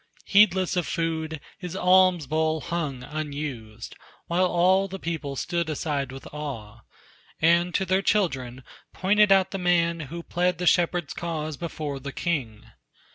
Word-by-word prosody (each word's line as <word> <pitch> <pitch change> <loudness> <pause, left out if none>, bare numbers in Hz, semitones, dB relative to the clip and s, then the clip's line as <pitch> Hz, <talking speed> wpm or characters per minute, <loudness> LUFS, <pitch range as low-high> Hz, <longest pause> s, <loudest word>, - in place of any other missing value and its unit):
Heedless 190 -3 +4
of 175 -3 0
food, 160 -1 -2 0.2
his 180 -1 -6
alms 185 -3 +4
bowl 155 +2 0
hung 150 -7 -3
unused. 140 -7 -6 0.3
While 180 +2 +2
all 185 +3 +3
the 195 0 -6
people 160 -6 -4
stood 170 +3 -2
aside 145 -3 -2
with 135 0 -10
awe, 120 -8 -6 0.6
And 170 +2 +3
to 190 - +1
their 190 +1 +2
children 135 - 0 0.3
pointed 205 +2 +3
out 195 -1 +4
the 195 - -3
man 170 -2 +2
Who 170 +2 -6
plead 180 +1 0
the 180 - -3
shepherd's 175 -2 +2
cause 155 -3 -4
before 150 -3 -5
the 140 +1 -6
king. 130 -11 -3
170 Hz, 145 wpm, -25 LUFS, 145-180 Hz, 0.6 s, Heedless